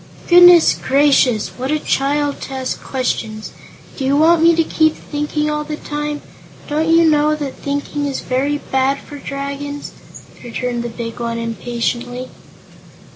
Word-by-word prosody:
"Goodness 355 -1 +8
gracious! 270 -5 +2
what 260 +1 -6
a 305 - +2
child 290 0 -1
to 270 - -7
ask 260 -1 -3
questions. 220 -4 -3 0.5
Do 275 - -4
you 275 +2 +2
want 325 +2 +4
to 330 - +4
keep 315 0 +2
me - - -17
thinking 295 0 -1
all 300 0 -1
the 300 0 -5
time? 295 0 -5 0.4
Don't 310 +2 0
you 330 0 +5
know 305 0 +3
that 290 -3 -5
thinking 285 +1 -3
is 275 - -3
very 275 +3 -1
bad 265 -1 0
for 290 0 -11
Dragons?" 280 +1 -5 0.5
returned 240 0 -3
the 240 - -4
big 230 0 -7
one, 235 -1 -3
impatiently. 240 +2 -3
280 Hz, 150 wpm, -18 LUFS, 255-300 Hz, 0.5 s, Goodness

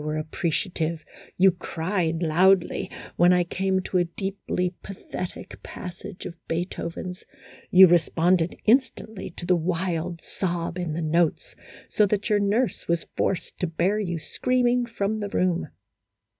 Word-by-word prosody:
13 150 - -6
were - - -1
appreciative, 160 +1 -2 0.3
you 190 +1 +6
cried 170 -1 -2
loudly 180 +4 +3 0.3
when 175 +1 +6
I 180 -1 +4
came 190 +2 0
to 185 - 0
a - - +4
deeply 180 0 -3
pathetic 185 -2 -7
passage 180 +2 -8
of - - -5
Beethoven's, 175 +1 -4 0.5
you 190 +1 +9
responded 175 0 +3
instantly 225 -4 +1
to 175 - -5
the 180 - +4
wild 170 0 -1
sob 175 -1 -3
in 170 -4 -2
the 165 +1 -2
notes, 165 +1 0 0.3
so 210 - +3
that 205 +2 -1
your 210 - +4
nurse 210 +5 0
was 170 0 0
forced 185 - -2
to 180 - 0
bear 175 +6 0
you 175 -5 -2
screaming 245 +7 +1
from 215 -2 -2
the 205 -1 -3
room." 180 -3 0
180 Hz, 145 wpm, -25 LUFS, 170-195 Hz, 0.5 s, you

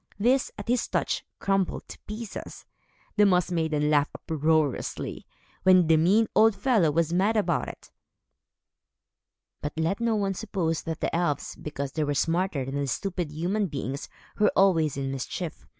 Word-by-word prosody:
These, 250 +5 +3
at 205 - -7
his 245 0 +1
touch, - - -1
crumbled 195 -2 -1
to - - -10
pieces. 215 0 -7 0.5
The 210 - +6
Moss 180 -2 +2
Maidens 160 -3 0
laughed 145 -1 +2
uproariously, 155 -3 -1 0.3
when 185 -2 +6
the 160 0 +5
mean 195 +8 +4
old 220 -1 +5
fellow 215 - +3
was 165 +2 +1
mad 200 +5 +2
about 175 -6 +1
it. - - -10 1.7
But 145 - -4
let 165 +6 0
no 230 -1 +1
one 200 -2 0
suppose 180 -6 -2
that 160 -1 -4
the - - -1
elves, 170 -4 -1
because 140 -2 -5
they 155 - -1
were 145 -1 -1
smarter 165 -3 0
than 140 +1 -2
stupid 180 +1 -3
human 185 +7 -1
beings, 140 -2 -5 0.3
were 210 - +4
always 165 -7 +3
in 135 -1 -2
mischief. 155 +5 -5
170 Hz, 155 wpm, -27 LUFS, 150-200 Hz, 1.7 s, The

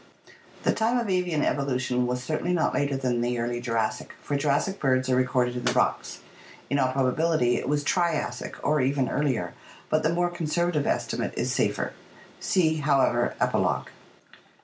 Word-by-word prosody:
The - - +3
time 230 +2 +1
of 230 -5 -1
avian 180 -5 +1
evolution 125 -3 0
was 125 0 -2
certainly 160 +5 -1
not 170 - +1
later 140 -1 0
than 125 -3 0
the 120 0 0
early 120 +1 -2
Jurassic, 115 -3 -2
for 145 - -2
Jurassic 145 +7 0
birds 130 -1 +1
are - - +4
recorded 125 -1 +1
in 125 - -4
the - - +2
rocks. - - 0 0.5
In 140 - +2
all 130 -1 +2
probability 130 0 +2
it - - -3
was 145 0 +1
Triassic 160 -7 -1
or 150 -1 +2
even 135 0 +1
earlier, 130 -12 -1 0.4
but 155 - +3
the 155 - +1
more 175 +1 +1
conser 175 0 -1
vative 150 -4 0
estimate - - -1
is - - 0
safer - - 0 0.5
(see, 160 -4 +2
however, 135 -5 +2
Epilogue). - - 0
140 Hz, 170 wpm, -26 LUFS, 125-160 Hz, 0.5 s, are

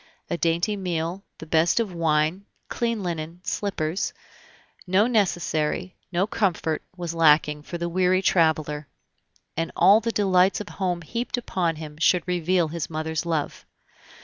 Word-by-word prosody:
A - - +1
dainty 170 +5 +1
meal, 180 -1 -3
the - - -9
best 160 +5 +3
of 215 -5 -1
wine, 165 +3 +1 0.2
clean 230 -3 -1
linen, 165 -1 -4
slippers 185 -4 -2 0.7
no 190 +4 +4
necessary, 180 -6 0 0.2
no 180 +2 +2
comfort, 180 -7 0 0.2
was 170 -2 -4
lacking 150 -2 +4
for 170 +4 -6
the 170 0 -2
weary 185 +2 +2
traveler, 155 -4 +1 0.7
and 165 - -2
all 195 +5 +6
the 230 +1 -2
delights 190 -3 +3
of 210 - -7
home 180 -3 -2
heaped 235 +9 -3
upon 180 -8 -1
him 155 -1 -9
should 180 +1 +3
reveal 175 -1 +1
his 165 -1 -4
mother's 160 +1 -3
love. 160 -3 -2
170 Hz, 145 wpm, -25 LUFS, 160-190 Hz, 0.7 s, all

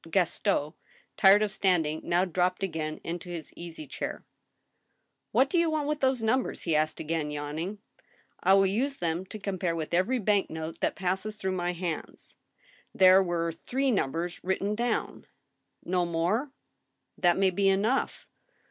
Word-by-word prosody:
Gaston, 170 -3 +1 0.4
tired 200 +2 +6
of 210 - -1
standing, 160 -6 +1
now 175 +2 +2
dropped 180 +1 0
again 160 -4 -3
into 175 +1 -5
his 170 -3 -6
easy 165 -2 -8
chair. - - -5 0.5
" - - -50
What 255 +5 +4
do 340 +5 +1
you 335 -1 +3
want 305 -2 -1
with 300 0 -1
those 260 -4 +1
numbers? 250 +4 0
" - - -7
he 165 -3 +1
asked, 155 +1 +1
again 160 -1 -2
yawning. 150 +7 -4 0.3
" - - -36
I 190 - +5
will 195 0 +5
use 255 +9 0
them 170 +2 -2
to 215 - -7
compare 190 -4 -2
with 160 0 -4
every 185 +9 +2
bank 205 -3 +1
note 160 0 -6
that - - 0
passes 190 +3 -2
through 190 -2 -2
my 180 -1 -1
hands.... 170 -2 -5 0.6
There 185 0 +7
were 170 -2 -1
three 260 +11 -1
numbers 175 - -2
written 190 +2 0
down." 235 +1 -2 0.3
" - - -42
No 180 0 +1
more? 180 - 0 0.2
" - - -51
" - - -52
That 175 -1 +4
may 190 -1 +3
be 195 +2 +2
enough." 210 +7 0
185 Hz, 175 wpm, -28 LUFS, 165-210 Hz, 0.6 s, There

